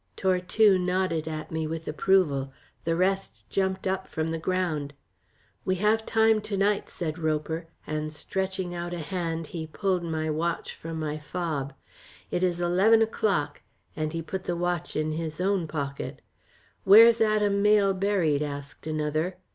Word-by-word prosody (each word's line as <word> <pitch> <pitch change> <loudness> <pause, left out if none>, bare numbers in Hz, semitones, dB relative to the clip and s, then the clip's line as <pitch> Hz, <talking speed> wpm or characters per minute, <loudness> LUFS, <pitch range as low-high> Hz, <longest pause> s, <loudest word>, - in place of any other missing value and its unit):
Tortue 190 +2 +3
nodded 180 -3 0
at 155 -1 -5
me 160 -1 -2
with 160 +1 -5
approval. 150 -4 +2 0.3
The 165 0 +1
rest 190 +2 -1
jumped 190 -1 0
up 190 0 -1
from 160 0 -2
the 165 - -2
ground. 160 -5 -1 0.7
"We 185 - +1
have 215 +3 +1
time 220 -1 +4
to 210 -1 -3
night," 200 +1 +1
said 160 -1 -4
Roper, 160 +1 -1 0.2
and 155 0 -3
stretching 190 +3 -3
out 175 0 -4
a - - -5
hand 165 -1 -3
he 160 -2 -4
pulled 185 +3 0
my 160 -1 -2
watch 165 +2 -2
from 165 0 -6
my 155 -1 -3
fob. 145 -4 -3 0.6
"It 175 - 0
is 180 -2 +1
eleven 195 +6 +4
o'clock," 200 -8 -1 0.3
and 155 0 -2
he 165 0 -4
put 185 +4 -5
the 175 - -1
watch 175 -1 -2
in 155 0 0
his 155 0 -4
own 190 -2 +1
pocket. 140 -3 -5 0.6
"Where's 225 +4 +8
Adam 210 -2 +3
Mayle 205 -1 +4
buried?" 185 -7 +1
asked 145 0 -6
another. 155 +3 -1
175 Hz, 155 wpm, -27 LUFS, 155-190 Hz, 0.7 s, Where's